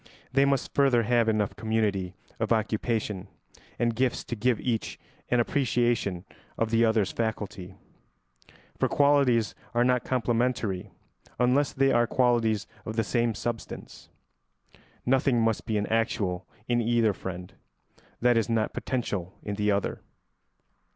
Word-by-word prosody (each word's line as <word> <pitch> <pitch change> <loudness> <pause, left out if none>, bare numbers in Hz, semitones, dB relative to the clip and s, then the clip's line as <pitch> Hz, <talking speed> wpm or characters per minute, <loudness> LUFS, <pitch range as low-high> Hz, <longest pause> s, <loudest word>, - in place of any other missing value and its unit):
They 135 +1 +5
must 140 -2 0
further 135 -4 +4
have 120 0 +2
enough 105 -2 0
community 105 -5 -1 0.2
of 110 -1 -1
occupation 110 -3 -1 0.5
and 120 -1 0
gifts 130 +1 0
to 120 - -5
give 120 +1 +1
each 115 -3 -2 0.3
an 125 - +3
appreciation 120 -7 0 0.3
of 115 -1 0
the 115 0 +4
other's 110 -4 +2
faculty; 105 -4 -4 1.0
for - - +2
qualities 140 -6 +3 0.2
are 120 - +4
not 125 0 +2
complementary 120 -6 0 0.5
unless 130 +4 +2
they 135 0 +2
are 120 0 +3
qualities 115 -5 +2 0.2
of 110 - -5
the 115 - +2
same 115 +1 0
substance. 115 +2 -6 1.0
Nothing 130 -1 +3
must 115 0 0
be 110 -2 0
actual 100 -4 -1 0.2
in 120 -1 +2
either 115 -2 +2
friend 90 -1 -7 0.7
that 120 0 +4
is 115 0 +1
not 115 -2 0
potential 100 -8 -3
in 105 - -3
the 105 +1 0
other. 100 -1 0
115 Hz, 130 wpm, -27 LUFS, 105-125 Hz, 1.0 s, They